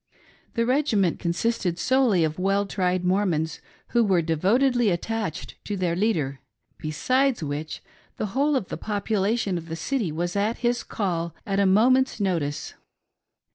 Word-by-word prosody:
The 230 - +2
regiment 235 - +2
con 170 - -1
sisted 180 -2 -1
solely 245 -4 +3
of 155 +2 -1
well 195 +2 +1
tried 185 -2 -1
Mormons 175 -4 0 0.3
who 235 -1 +3
were 185 -5 +2
devotedly 225 - +2
attached 200 -1 -3
to 205 - -3
their 175 -2 0
leader; 160 -10 0 0.4
besides 255 - +1
which, 150 +1 -4 0.3
the - - -1
whole 285 +3 +2
of 220 -9 -1
the - - -4
population 205 -1 -1
of 165 0 -12
the 165 - -3
city 220 - -1
was 175 +4 -3
at 210 +3 0
his 240 0 +2
call 170 -5 -3
at 195 -1 0
a 200 - +4
moment's 250 +7 +4
notice. 165 -7 -1
195 Hz, 150 wpm, -25 LUFS, 170-230 Hz, 0.4 s, a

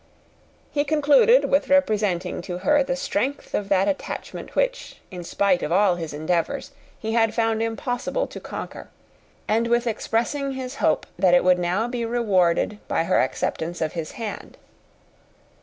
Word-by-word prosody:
He 290 - +1
concluded 300 - +4
with 280 - +2
representing 210 -11 +1
to 175 0 -5
her 295 0 +5
the 270 -1 -1
strength 275 +1 -2
of 200 -1 -2
that 195 0 +3
attachment 290 - -4
which - - -1
in 180 -1 -7
spite 185 +1 +1
of 150 - -3
all 190 +1 +4
his 165 -3 -5
endeavours 160 +3 -2 0.3
he 220 - -4
had 225 -1 +2
found 225 -1 +1
impossible 245 - -2
to - - -9
conquer; - - -8 0.6
and 225 +2 +1
with 235 +1 +2
expressing 240 +5 -1
his 260 0 -6
hope - - +1
that 180 -2 +5
it 175 - +4
would 180 0 +4
now 180 +6 0
be 240 -1 -3
rewarded 210 -4 +1
by - - +1
her 180 +3 +2
acceptance 160 +6 -2
of 155 -2 -2
his 165 -2 -5
hand. 225 -3 -7
220 Hz, 155 wpm, -23 LUFS, 180-260 Hz, 0.6 s, her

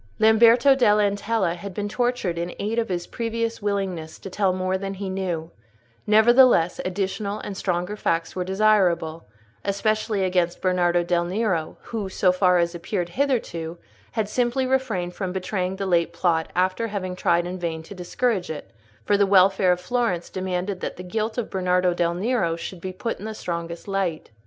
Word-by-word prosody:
Lamberto 230 +5 +6
dell' 230 -6 +4
Antella 205 -2 +1
had 185 +1 -8
been 205 0 -2
tortured 240 -6 -1
in 175 +1 -4
aid 220 +3 -1
of 225 - -2
his 175 -2 -2
previous 230 -1 -3
willingness 190 -6 -2
to 195 - -9
tell 195 -1 +2
more 185 0 -1
than 195 +1 -4
he 195 0 -5
knew; 175 -4 -3 0.6
nevertheless, 220 -4 +5
additional 200 +2 -2
and 200 - -6
stronger 180 +1 -2
facts 165 -5 -1
were 185 - -1
desirable, 185 -5 +2 0.4
especially 215 0 0
against 180 -2 +1
Bernardo 175 -2 +2
del 175 0 +1
Nero, 185 -4 -1
who, 215 -4 -4
so 185 -1 +3
far 180 -1 +3
as 170 0 +1
appeared 175 +1 -3
hitherto, 175 - -1 0.4
had 220 -3 0
simply 245 +3 0
refrained 235 -10 -1
from 190 -1 -3
betraying 185 0 -2
the 195 0 -3
late 170 -3 +2
plot 165 -3 +1
after 185 +5 +1
having 190 -4 -4
tried 170 -1 +2
in 180 +1 -5
vain 165 -2 -3
to 180 - -10
discourage 190 +2 -1
it; 155 - -7 0.3
for 205 - +3
the 200 -1 +3
welfare 190 -1 +5
of 180 - +1
Florence 225 -5 -1
demanded 185 +1 -3
that - - -4
the 180 - -7
guilt 220 +4 -3
of 240 - -3
Bernardo 180 -1 +2
del 170 0 0
Nero 190 -4 0
should 170 +1 -7
be 185 - -4
put 215 +5 -4
in 205 - -7
the 220 0 -5
strongest 170 -2 -5
light. 190 -8 -2
190 Hz, 175 wpm, -24 LUFS, 175-215 Hz, 0.6 s, Lamberto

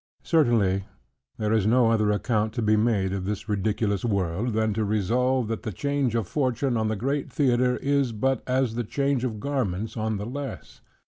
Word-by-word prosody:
Certainly 110 - +2 0.5
there 105 0 0
is 110 -2 +2
no 115 0 +4
other 110 -2 +2
account 105 0 0
to 120 -1 -2
be 110 0 +3
made 105 -4 +1
of 95 -1 -3
this 105 +2 -4
ridiculous 105 -1 0
world, 100 +1 -1
than 110 0 +1
to 110 +1 -1
resolve, 115 +5 +1
that 115 - -3
the 110 - -4
change 140 +2 -1
of 115 -5 -1
fortune 130 -1 0
on 110 -1 0
the 110 - 0
great 135 +7 -2
theatre, 125 -4 +2
is 140 -3 +1
but 130 +3 0
as 130 -2 +1
the 120 +1 -2
change 140 +2 0
of 110 -4 -2
garments 110 -6 -2
on 110 -1 -1
the 100 - -4
less. 135 +3 -7
115 Hz, 190 wpm, -25 LUFS, 105-130 Hz, 0.5 s, no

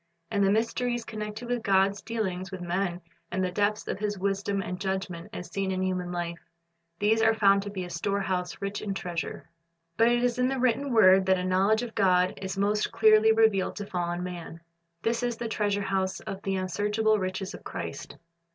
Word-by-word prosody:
And 200 -2 +2
the 195 - +4
mysteries 230 +2 0
connected 215 +2 -6
with 245 -1 -1
God's 195 0 +2
dealings 190 -5 -3
with 190 - -6
men, 175 0 -2 0.3
the 185 0 0
depths 205 +3 0
of - - -3
His 205 -1 -2
wisdom 200 +1 -1
and 180 -1 -4
judgment 190 -3 -3
as 180 - -7
seen 195 -1 -1
in 185 0 -1
human 180 -1 -2
life, 170 -1 -3 0.3
— 170 0 -50
these 220 +2 +3
are 225 0 +4
found 200 -2 +4
to 205 - -6
be 190 -2 -4
a 175 - -7
storehouse 185 0 -2
rich 200 +1 -3
in 200 -2 -3
treasure. 175 -4 -4 0.5
But 230 - +5
it 240 0 +3
is 245 0 +1
in 250 - +3
the 270 +1 -1
written 255 +2 +1
word 190 -4 +6
that 190 0 +4
a 180 - -2
knowledge 195 +5 +2
of 235 -2 -6
God 185 -2 +3
is 190 0 -4
most 210 +2 +1
clearly 220 -1 +5
revealed 220 -4 +3
to 205 - -5
fallen 175 -2 -2
man. 170 -2 -7 0.4
This 230 +1 0
is 240 -1 -1
the 235 - -3
treasure 205 -2 0
house 190 -1 -1
of 195 0 -6
the 195 -1 -1
unsearchable 210 +3 +1
riches 190 +1 -3
of - - -10
Christ. - - -6
195 Hz, 200 wpm, -28 LUFS, 185-220 Hz, 0.5 s, word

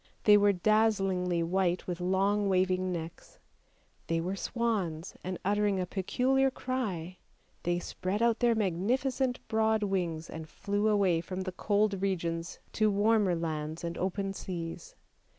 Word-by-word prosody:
They 210 - +7
were 205 0 +5
dazzlingly 195 -3 +2
white 180 +1 0
with 175 -1 -4
long 195 +3 +2
waving 185 0 +1
necks; 165 -1 -7 0.7
they 165 0 +1
were 180 +4 -2
swans, 195 -8 -2
and 185 0 -3
uttering 205 -1 +2
a 180 - 0
peculiar 255 +9 +1
cry 205 -10 -3 0.4
they 175 0 0
spread 185 +3 -3
out 235 0 +2
their 240 -1 +3
magnificent 245 +7 0
broad 220 -1 +2
wings 175 -5 -1
and 160 -1 -8
flew 205 +3 -1
away 195 -6 +3
from 185 +2 -5
the 185 0 -3
cold 205 +1 +1
regions 170 -3 -2
to 215 -1 +2
warmer 205 -2 +3
lands 160 -1 -3
and 170 0 -3
open 195 +1 -2
seas. 185 - -6
190 Hz, 140 wpm, -30 LUFS, 175-215 Hz, 0.7 s, They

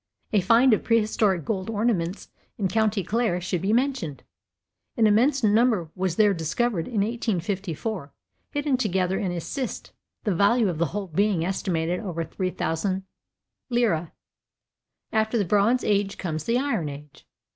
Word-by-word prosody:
A 205 - +4
find 230 +6 +5
of 215 - +1
prehistoric 210 - +2
gold 195 -2 -2
ornaments 205 -5 -1 0.3
in 200 - 0
county 220 -2 +1
Clare 215 -1 0
should 180 -1 -2
be 195 - 0
mentioned. 235 - 0 0.7
An 225 - +4
immense 245 +6 +3
number 215 -6 +3
was 185 -2 -1
there 210 0 +4
discovered 175 +3 -1
in 225 -5 0
1854 200 - -2 0.4
hidden 290 -2 0
together 190 -5 0
in 190 -3 -1
a 175 - -3
cist, 255 - -5 0.3
the 205 - +1
value 205 +4 +3
of 165 -3 -4
the 170 - +2
whole 200 +6 -4
being 190 0 +1
estimated 180 -2 -1
at - - -8
over 165 -2 -3
£3,000. 185 +2 -3 1.0
After 220 +1 +1
the 205 - +1
bronze 210 +7 +3
age 200 -1 +1
comes 155 -4 -4
the 235 +1 +2
iron 235 - -1
age. 145 +1 -11
200 Hz, 145 wpm, -25 LUFS, 175-225 Hz, 1.0 s, find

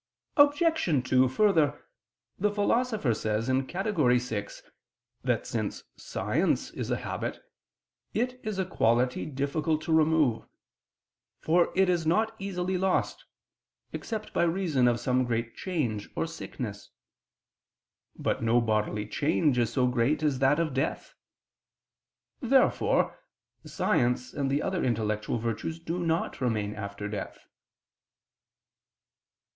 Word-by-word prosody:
Obj. 290 - +3
2: 130 0 +4
Further, 155 - +2 0.5
the 210 +2 +2
Philosopher 210 - +1
says 110 +2 -1
(Categor. 155 - +1
vi) 110 -4 -5 0.6
that - - 0
since - - -3
science - - -1
is - - -5
a - - +1
habit, - - -4 0.7
it 250 +3 -1
is 215 -3 -3
a 190 - 0
quality 125 -6 +1
difficult 150 +3 -1
to 165 0 0
remove: 155 -8 +3 0.9
for 170 +2 +2
it 190 0 +4
is 175 -3 +1
not 220 +6 +2
easily 185 -2 -2
lost, 190 0 0 0.7
except 220 -2 -5
by - - +1
reason 165 -7 +2
of 120 -1 +2
some 125 +1 +1
great 115 -1 -2
change 125 - -2
or - - 0
sickness. - - -7 1.3
But - - -1
no 115 +1 +3
bodily 105 -2 0
change 145 +1 +1
is 115 -2 +1
so 125 0 +2
great 125 +5 +1
as 145 -4 +1
that 135 +3 +3
of 160 -4 0
death. 145 - -2 1.3
Therefore 265 +1 +2 0.5
science 125 +1 0
and 140 -2 -1
the 140 +2 0
other 185 -2 -1
intellectual 110 -2 -1
virtues 115 +8 -3
do 165 +2 -4
not 165 -4 -1
remain 105 -4 0
after 100 -1 -6
death. 105 0 -6
145 Hz, 120 wpm, -28 LUFS, 120-180 Hz, 1.3 s, 2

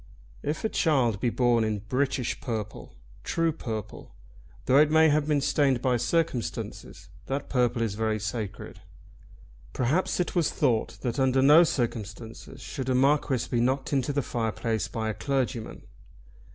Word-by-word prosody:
If 150 +2 -3
a - - +1
child 130 - +1
be 120 - +1
born 120 -1 +2
in 105 -2 -2
British 130 0 -1
purple, 110 -4 -5 0.3
true 165 -1 0
purple, 110 - -7 0.5
though 135 +2 +5
it 150 0 +5
may 160 +1 +5
have 150 0 +1
been 150 -2 +2
stained 135 -3 +2
by 125 0 +1
circumstances, 155 -2 -3 0.2
that 135 +1 -3
purple 125 -2 +1
is 110 -3 -2
very 110 0 -1
sacred. 105 0 -5 0.9
Perhaps 140 +12 0
it 180 - -1
was 170 -4 +2
thought 120 -7 0
that 125 +1 -2
under 130 0 +3
no 150 +5 +8
circumstances 115 - -4
should 130 -1 -5
a 130 - +2
Marquis 135 -1 +2
be 120 -2 0
knocked 130 +4 0
into 135 0 +1
the 140 -1 -1
fireplace 115 -1 -2
by 110 -1 -4
a 110 - -1
clergyman. 130 -3 -3
125 Hz, 150 wpm, -27 LUFS, 115-145 Hz, 0.9 s, no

